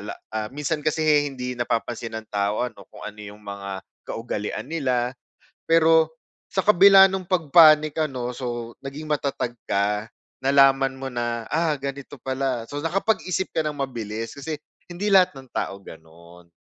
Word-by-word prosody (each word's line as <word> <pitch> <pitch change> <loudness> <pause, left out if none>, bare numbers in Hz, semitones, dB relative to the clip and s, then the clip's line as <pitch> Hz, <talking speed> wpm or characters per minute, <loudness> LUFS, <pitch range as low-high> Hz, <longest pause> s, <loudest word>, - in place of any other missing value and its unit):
la - - -5 0.4
minsan 150 +1 -2
kasi 155 +1 0 0.3
hindi 125 -2 -5
napapansin 120 -1 -2
ng 110 -1 -6
tao 100 +1 -1
ano 100 -5 -11
kung - - -12
ano 105 0 -7
yung 105 0 -10
mga 100 -2 -6 0.3
kaugalian 115 +2 -4
nila. 130 -5 -1 0.5
Pero 160 -1 +4 0.4
sa 190 - -1
kabila 195 -1 +8
nung 190 -1 -3
pag-panic 155 -3 +6
ano, 125 -4 -4
so 120 -2 -5
naging 145 +3 -7
matatag 140 -5 -2
ka. 105 +2 0 0.3
Nalaman 135 0 +5
mo 135 0 -6
na, 120 -1 -2
ah, 160 0 +2
ganito 140 +1 -6
pala 130 -2 -2
so 145 - -5
nakapag-isip 190 +1 0
ka - - +2
ng 150 -1 -3
mabilis 115 -4 -4
kasi 150 +3 -4 0.4
hindi 185 +4 -3
lahat 185 -2 +6
ng 130 - -14
tao, 100 0 -3
gano'n. 85 +2 -15
135 Hz, 150 wpm, -24 LUFS, 115-155 Hz, 0.5 s, kabila